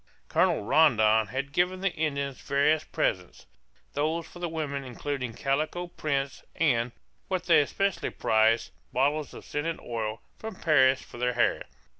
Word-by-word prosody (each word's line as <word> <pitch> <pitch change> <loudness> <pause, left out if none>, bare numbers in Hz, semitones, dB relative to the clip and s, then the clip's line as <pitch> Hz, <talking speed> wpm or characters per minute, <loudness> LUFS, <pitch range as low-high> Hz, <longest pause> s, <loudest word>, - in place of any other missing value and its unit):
Colonel - - +2
Rondon 110 -5 +4
had 135 +3 -4
given 180 +4 +1
the 195 -2 0
Indians 140 -3 -2
various 145 +3 +2
presents, 90 -7 -2 0.5
those 160 +3 -1
for 175 - -13
the 175 -1 -2
women 145 -4 -3
including 130 -1 -4
calico 155 +6 -1
prints, 140 -5 -2
and, 125 -7 +2 0.4
what 185 -3 -1
they 165 -4 +5
especially 195 +6 -1
prized, 110 +1 +2 0.2
bottles 145 +4 +1
of - - -10
scented 160 +3 -3
oil, 110 -2 -4 0.2
from 220 -2 -6
Paris, 135 -6 +4
for 120 - -12
their 125 0 +1
hair. 120 - +1
140 Hz, 145 wpm, -28 LUFS, 125-160 Hz, 0.5 s, they